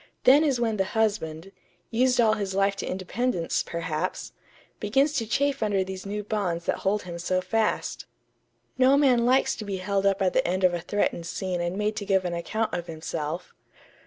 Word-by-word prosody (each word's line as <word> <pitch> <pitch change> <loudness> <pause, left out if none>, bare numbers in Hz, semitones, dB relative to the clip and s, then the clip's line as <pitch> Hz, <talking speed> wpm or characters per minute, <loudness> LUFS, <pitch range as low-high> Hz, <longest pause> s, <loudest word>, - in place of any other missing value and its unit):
Then 285 +4 +7
is 275 -5 +1
when 225 -2 0
the 190 - +2
husband 195 -5 -1 0.4
used 250 +2 +2
all 220 -2 +5
his 200 -3 -3
life 195 0 +2
to - - -4
independence, 185 0 -1
perhaps 170 +1 -3 0.5
begins 270 +8 +2
to 230 -6 -1
chafe 275 +4 0
under 205 -3 +1
these 190 +1 -7
new 210 +1 -3
bonds 190 -5 -2
that - - 0
hold 205 +2 0
him 170 -1 -7
so 185 +2 0
fast.... 215 +4 -1 0.7
No 265 +2 +6
man 250 -5 +4
likes 260 +2 +3
to 220 - -5
be 200 -2 -3
held 195 +1 0
up 195 0 +2
at 185 - +2
the - - +2
end 185 +2 -1
of 180 -1 +5
a 175 - -2
threatened 175 -2 -1
scene 180 +1 -3
and 175 +2 -2
made 210 +1 0
to 205 - -3
give 190 -1 +2
an 175 - -2
account 215 +6 -2
of 175 0 -3
himself.... 160 +1 -5
195 Hz, 195 wpm, -26 LUFS, 180-225 Hz, 0.7 s, Then